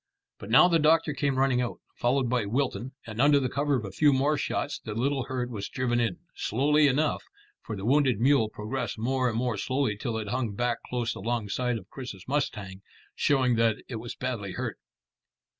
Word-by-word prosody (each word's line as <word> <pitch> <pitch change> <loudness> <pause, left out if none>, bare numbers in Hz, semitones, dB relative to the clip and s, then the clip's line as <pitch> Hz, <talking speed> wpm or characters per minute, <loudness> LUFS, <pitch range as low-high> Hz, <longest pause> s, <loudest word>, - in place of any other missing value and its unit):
But 100 - -9
now 130 +10 +7
the 170 -2 +3
doctor 155 0 +3
came 140 -2 0
running 130 -2 +3
out, 120 - -3
followed 125 +1 +1
by 120 -4 0
Wilton, 130 +2 -1
and 115 0 -3
under 145 0 +6
the 130 -2 -2
cover 145 +1 +1
of 115 -5 -2
a 100 - -6
few 145 +9 +4
more 140 +3 +2
shots 145 - -2
the 110 -2 -6
little 135 +2 0
herd 125 -2 -3
was 100 -4 -5
driven 120 -2 0
in, 115 -7 0 0.2
slowly 145 +6 +3
enough, 145 +3 +1 0.4
for 110 - -6
the 95 0 -6
wounded 130 -3 +3
mule 130 -3 +4
progressed 115 +2 -4
more 130 +3 +1
and 110 - -3
more 120 -2 0
slowly 130 -2 0
till 110 +2 -3
it 105 -2 -4
hung 120 -3 -2
back 120 +1 0
close 120 -2 -1
alongside 120 +2 -1
of 95 -4 -11
Chris's 120 -9 -8
mustang, 105 -9 -2 0.3
showing 130 -4 +2
that 115 -1 +3
it 120 - -5
was 115 +1 -7
badly 115 -7 -4
hurt. - - -4
125 Hz, 195 wpm, -28 LUFS, 110-135 Hz, 0.4 s, now